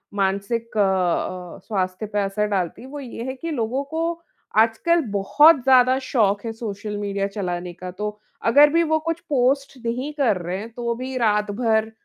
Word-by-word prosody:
मानसिक 200 Hz, +4 st, -1 dB
अ 185 Hz, -2 st, 0 dB
अ, -, -, -15 dB
स्वास्थ्य 185 Hz, -1 st, -2 dB
पे 210 Hz, 0 st, -2 dB
असर 205 Hz, +2 st, -1 dB
डालती 190 Hz, -3 st, -2 dB
है। 255 Hz, -, -10 dB
वो 290 Hz, +1 st, -7 dB
ये 240 Hz, -3 st, -7 dB
है 260 Hz, +1 st, -3 dB
कि 330 Hz, +5 st, -5 dB
लोगों 255 Hz, 0 st, -1 dB
को 320 Hz, +4 st, -3 dB, 0.5 s
आजकल 230 Hz, +10 st, +3 dB
बहुत 270 Hz, +9 st, +5 dB
ज़्यादा 255 Hz, 0 st, +5 dB
शौक 215 Hz, -6 st, +1 dB
है 225 Hz, -, -2 dB
सोशल 210 Hz, -2 st, -5 dB
मीडिया 200 Hz, -1 st, -2 dB
चलाने 180 Hz, -3 st, -4 dB
का। 180 Hz, +1 st, -8 dB
तो 210 Hz, +3 st, -5 dB, 0.3 s
अगर 285 Hz, +6 st, +7 dB
भी 335 Hz, 0 st, +4 dB
वो 315 Hz, -1 st, +1 dB
कुछ 330 Hz, +1 st, -3 dB
पोस्ट 275 Hz, 0 st, +1 dB
नहीं 250 Hz, +5 st, -2 dB
कर 255 Hz, -10 st, +2 dB
रहे 175 Hz, +2 st, -3 dB
हैं 215 Hz, +4 st, -7 dB
तो 235 Hz, 0 st, -2 dB
भी 260 Hz, +2 st, -5 dB
रात-भर 220 Hz, 0 st, +1 dB
225 Hz, 180 wpm, -22 LUFS, 200-260 Hz, 0.5 s, अगर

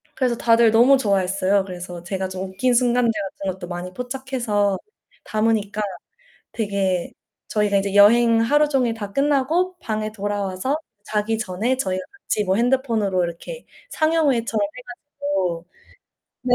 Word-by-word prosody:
그래서 250 Hz, -3 st, +1 dB
다들 230 Hz, -1 st, +4 dB
너무 245 Hz, +5 st, +6 dB
좋아했어요. 195 Hz, -2 st, +1 dB
그래서 180 Hz, -2 st, -8 dB
제가 190 Hz, +1 st, -3 dB
좀 190 Hz, 0 st, -5 dB
웃긴 245 Hz, +7 st, +1 dB
순간들 240 Hz, -1 st, +3 dB
같은 195 Hz, -2 st, -4 dB
것도 175 Hz, -1 st, -9 dB
많이 180 Hz, +1 st, -6 dB
포착해서 245 Hz, -5 st, -1 dB, 0.5 s
담으니까 215 Hz, -1 st, 0 dB, 0.7 s
되게 195 Hz, -5 st, -1 dB, 0.4 s
저희가 210 Hz, -2 st, +1 dB
이제 195 Hz, 0 st, 0 dB
여행 230 Hz, +3 st, +6 dB
하루 295 Hz, +6 st, +3 dB
종일 250 Hz, -5 st, +1 dB
다 205 Hz, -3 st, -7 dB
끝나고 295 Hz, -, +1 dB
방에 215 Hz, -3 st, -3 dB
돌아와서 205 Hz, +5 st, -2 dB, 0.3 s
자기 215 Hz, +1 st, -1 dB
전에 220 Hz, +7 st, -1 dB
저희가 185 Hz, -6 st, -2 dB, 0.2 s
같이 210 Hz, -, -1 dB
뭐 190 Hz, +1 st, +1 dB
핸드폰으로 230 Hz, -7 st, +1 dB
이렇게 170 Hz, -, -7 dB, 0.2 s
상영회처럼 280 Hz, -9 st, +1 dB
해 215 Hz, +5 st, -7 dB
가지고. 245 Hz, -, -4 dB, 0.8 s
네, 245 Hz, -1 st, +4 dB
215 Hz, 320 characters per minute, -22 LUFS, 195-250 Hz, 0.8 s, 너무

